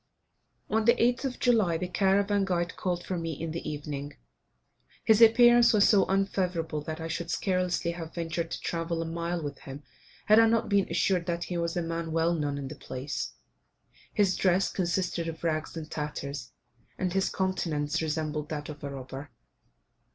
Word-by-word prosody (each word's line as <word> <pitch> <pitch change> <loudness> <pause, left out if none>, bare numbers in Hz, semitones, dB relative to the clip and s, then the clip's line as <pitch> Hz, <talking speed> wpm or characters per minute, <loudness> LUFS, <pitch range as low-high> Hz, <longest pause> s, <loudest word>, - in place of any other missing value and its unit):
On 220 0 +1
the 235 - +6
8th 245 +3 +2
of 255 -2 -3
July 215 -9 +3
the 180 - -3
caravan 200 +2 +2
guide 175 -2 -1
called 175 -2 -2
for 185 -2 -2
me 165 -1 -3
in 165 -1 -3
the 165 - -4
evening. 145 -1 -5 0.9
His 220 0 +4
appearance 240 +1 +7
was 205 -2 +5
so 200 -3 +5
unfavourable 180 -5 0
that 160 0 -5
I 165 - -4
should 165 +1 -4
scarcely 180 -2 0
have 165 -1 -8
ventured 170 0 -2
to - - -4
travel 165 0 -2
a - - -6
mile 170 +1 -3
with 145 -2 -5
him 140 +2 -9 0.4
had 215 +1 +6
I 225 - +6
not 230 0 +1
been 200 -2 +2
assured 175 +1 +1
that 170 0 -1
he 175 - -4
was 170 +1 -2
a 175 - 0
man 165 0 -3
well 165 +1 +2
known 145 -3 -1
in 140 -1 -5
the 150 - -7
place. 140 +1 -5 0.8
His 200 -4 +2
dress 185 0 +2
consisted 180 -2 -1
of 165 0 -6
rags 160 0 -1
and 155 -1 -5
tatters, 140 -4 -5 0.5
and 185 -2 -1
his 195 0 +1
countenance 165 -6 -1
resembled 155 -1 -2
that 150 -1 -4
of 150 -1 -9
a 140 - -3
robber. 135 +1 -7
170 Hz, 180 wpm, -28 LUFS, 155-190 Hz, 0.9 s, appearance